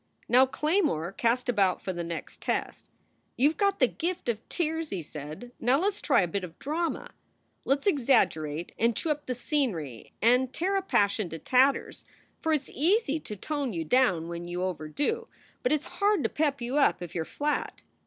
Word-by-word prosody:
Now 255 +2 +6
Claymore 300 - 0
cast 235 +4 0
about 200 -6 +2
for 185 - -4
the 175 -1 -4
next 170 -1 -6
test. - - -3 0.5
"You 275 +4 +5
ve - - -11
got 400 -2 +2
the 255 - +5
gift 340 -1 -3
of 220 -3 0
tears," 320 -2 -1
he 180 -4 -4
said. 155 +11 -8
"Now 250 +3 +3
let 390 +4 +2
s 410 - -8
try - - +4
a - - 0
bit 195 +3 -3
of 170 -2 -8
drama! 325 +4 -2 0.5
Let 275 +1 +2
s - - -19
exaggerate 200 - +2
and 230 0 +3
chew 320 - 0
up 295 0 -3
the 250 - -1
scenery 205 - -2
and 250 +3 +3
tear 375 +8 -1
a 390 - +2
passion 205 - +1
to 165 - -6
tatters, 260 - +2 0.4
for 320 - -1
it 305 -3 +3
s - - -15
easy 320 - +2
to 215 - -7
tone 280 +3 -3
you 165 -2 -2
down 185 -7 +3
when 170 0 -6
you 175 +1 -3
overdo, 185 - -2 0.3
but 250 - +1
it 305 -2 +2
s - - -14
hard 405 -4 +3
to - - +1
pep 290 -3 0
you 245 +4 -1
up 280 -10 +3
if 175 - -8
you 170 - -1
re - - -3
flat." 295 - -2
255 Hz, 205 wpm, -28 LUFS, -, 0.5 s, Now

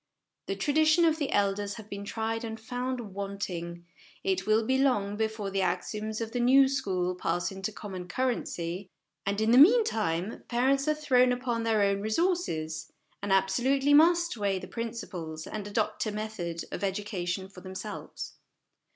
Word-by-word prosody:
The 195 - -1
traditions 310 - +3
of 320 -1 +3
the 285 - -1
elders 200 0 +1
have 220 -3 -10
been 200 -1 -6
tried 225 +2 -2
and 225 -1 -5
found 245 -2 -4
wanting; 180 -4 -5 0.4
it 190 0 0
will 215 +1 +3
be 260 +3 +2
long 205 -7 +2
before 220 -2 -2
the 195 0 0
axioms 210 +4 -2
of 225 -1 -4
the 245 - -2
new 265 +3 +6
school 185 -9 -1
pass 175 0 -1
into 195 +2 -4
common 190 -4 -7
currency; 185 -6 -2 0.4
and, 200 +1 0
in 220 +1 +2
the 245 - +7
meantime, 225 - +4
parents 265 +3 +2
are 305 - +3
thrown 255 -4 +4
upon 245 -2 -1
their 225 -2 +2
own 200 0 +1
resources, 215 - -1 0.3
and 200 0 -3
absolutely 250 +9 +3
must 340 +2 +5
weigh 200 -3 0
principles, 180 -9 -6
and 205 -1 -5
adopt 205 +1 -1
a - - -1
method, 210 -6 -4
of - - -5
education 190 -2 -2
for 190 -1 -13
themselves. 190 +3 -7
215 Hz, 160 wpm, -29 LUFS, 190-250 Hz, 0.4 s, the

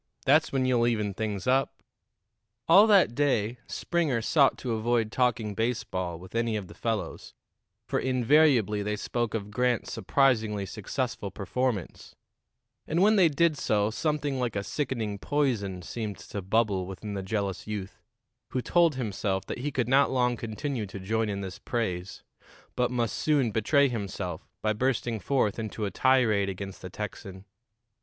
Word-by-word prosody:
That's 150 +4 +4
when 130 -1 +1
you'll 120 -2 +3
even 105 -4 0
things 105 -1 -3
up." 130 +1 +1 0.8
All 195 +6 +8
that 195 - +5
day 120 -4 0
Springer 160 -9 0
sought 140 +2 +4
to 125 - -4
avoid 115 0 0
talking 120 -4 +1
baseball 95 -6 -2
with 90 +2 -13
any 115 -1 0
of 105 -2 -3
the - - -12
fellows, 115 -3 -4 0.5
for - - -1
invariably 130 -4 +3
they 105 +1 -1
spoke 120 +2 -2
of 105 -2 -4
Grant's 125 +1 0
surprisingly 110 -7 +1
successful - - -3
performance; 125 -9 -3 0.7
and 170 +4 +2
when 215 +2 +5
they 185 -5 +5
did 155 0 +2
so 105 0 +1
something 145 0 -1
like 120 -4 -1
a 100 - -1
sickening 115 -7 -3
poison 110 -12 -1
seemed 105 +1 -5
to 100 - -7
bubble 100 -1 +1
within 100 +2 -6
the 100 - -3
jealous 100 0 -3
youth, 100 -3 -6 0.5
who 130 - 0
told 170 -4 +3
himself 100 -5 -2
that - - -5
he 145 +4 -2
could 130 -5 -1
not 135 +2 +4
long 125 -2 +1
continue 115 +1 -4
to 100 0 -8
join 110 +3 -1
in 100 -1 -3
this 95 +1 -7
praise, 95 -6 -3 0.5
but 125 -1 +1
must 120 -2 -1
soon 140 -7 +2
betray 140 +7 +3
himself 100 -7 -5
by 110 0 +2
bursting 120 -1 -1
forth 115 -1 0
into 110 -1 -3
a 100 - -3
tirade 115 -7 +3
against 95 0 -6
the 90 - -7
Texan. 95 -1 -7
115 Hz, 160 wpm, -28 LUFS, 100-130 Hz, 0.8 s, All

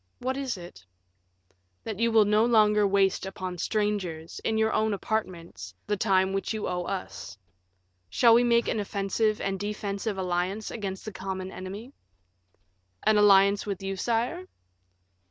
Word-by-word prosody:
"What 260 +1 -2
is 265 -6 -3
it?" 175 - -11 1.0
"That 215 -2 -5
you 230 0 +2
will 220 -2 +5
no 210 +1 +3
longer 210 -3 +4
waste 195 -1 +2
upon 185 -2 -6
strangers, 190 -7 -2
in 220 - 0
your 220 0 +2
own 215 -1 +1
apartments, 170 - -4
the 210 - 0
time 190 -2 +2
which 195 +3 -2
you 215 - -3
owe 180 -1 -2
us. 185 - -6 0.7
Shall 230 - +5
we 240 +1 +5
make 235 -1 +3
an - - 0
offensive 205 +2 -1
and 195 -1 -2
defensive 205 0 -3
alliance 185 +3 -2
against 195 -4 -5
the 215 - -5
common 190 0 -5
enemy?" 200 +9 -8 1.1
"An 215 - +4
alliance 200 0 +5
with 195 -2 -4
you, 195 0 -3
sire?" 240 - -1
200 Hz, 150 wpm, -27 LUFS, 190-220 Hz, 1.1 s, will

